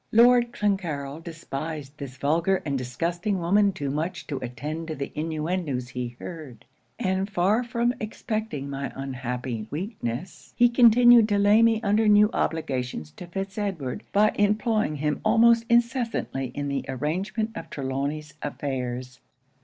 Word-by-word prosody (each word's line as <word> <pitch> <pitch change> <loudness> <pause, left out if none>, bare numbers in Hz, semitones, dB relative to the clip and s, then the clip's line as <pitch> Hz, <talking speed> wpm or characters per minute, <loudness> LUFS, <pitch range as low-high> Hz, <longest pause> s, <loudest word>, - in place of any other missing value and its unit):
'Lord 240 +1 +6
Clancarryl 165 -9 -2
despised 155 -3 -6
this 135 -2 -7
vulgar 165 +7 +1
and 140 -2 -1
disgusting 170 - -2
woman 200 +4 +3
too 145 -8 -4
much 160 +5 -3
to 140 - -4
attend 150 +6 -5
to 160 - -4
the 140 -1 -5
inuendos 155 -4 -2
he 125 -1 -5
heard; 145 -10 -9 0.3
and 190 -3 -1
far 200 +5 +2
from 235 0 0
suspecting 215 -8 -3
my 140 0 -4
unhappy 125 -4 -4
weakness, 170 - -5
he 240 -1 +6
continued 240 -1 +7
to 205 - +2
lay 205 +2 +5
me 230 -1 +4
under 215 +1 +3
new 210 +1 +6
obligations 125 - -2
to 175 - -10
Fitz 195 +3 -5
Edward 170 -11 -3
by 210 +1 +4
employing 210 -3 +2
him 150 +1 -1
almost 230 +1 +5
incessantly 235 - +1
in 145 0 -2
the 140 -1 -2
arrangement 190 - -2
of 165 -6 -7
Trelawny's 140 +2 -3
affairs. 125 -3 -4
165 Hz, 140 wpm, -26 LUFS, 140-210 Hz, 0.3 s, continued